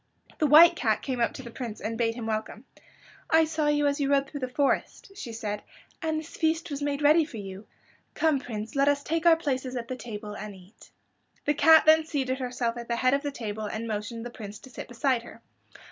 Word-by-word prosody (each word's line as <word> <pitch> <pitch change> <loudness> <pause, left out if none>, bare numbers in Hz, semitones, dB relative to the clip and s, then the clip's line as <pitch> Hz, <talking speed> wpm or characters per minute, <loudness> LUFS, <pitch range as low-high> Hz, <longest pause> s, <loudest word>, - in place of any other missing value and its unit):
The 305 - +3
White 335 +4 +8
Cat 220 -8 0
came 260 -3 -3
up 235 - +2
to 265 - -8
the 235 - -9
Prince 230 -3 -6
and 225 +1 -3
bade 230 0 0
him 235 -2 -6
welcome. 220 +2 -4 0.6
"I 320 0 +5
saw 310 -1 -1
you 295 0 +2
as 285 0 +1
you 275 - +1
rode 280 -1 +2
through 285 - -7
the 255 - -2
forest," 275 +8 -1
she 245 - -7
said, 210 -2 -4 0.4
"and 315 -1 -1
this 315 +1 -10
feast 320 0 0
was 285 0 -4
made 285 0 -2
ready 310 +3 +6
for 295 -7 -8
you. 195 0 -8 0.5
Come, 315 -4 +2
Prince, 220 -3 -6
let 275 +1 +3
us 285 0 +2
take 330 +2 0
our 330 - +8
places 260 -5 -2
at 235 -2 -5
the 255 - -3
table 210 -4 -7
and 210 -1 -7
eat." 190 +4 -17 0.6
The 295 - +3
cat 320 +2 +6
then 315 +1 +6
seated 270 -4 -2
herself 245 -2 -2
at 235 0 -7
the 235 - -1
head 255 +2 +2
of 280 - +2
the 290 - -2
table 215 -5 -5
and 220 +2 -4
motioned 220 +2 -4
the 240 - -6
Prince 210 -3 -8
to 260 - -14
sit - - -8
beside 245 0 0
her. 235 - -14
255 Hz, 235 wpm, -27 LUFS, 225-295 Hz, 0.6 s, White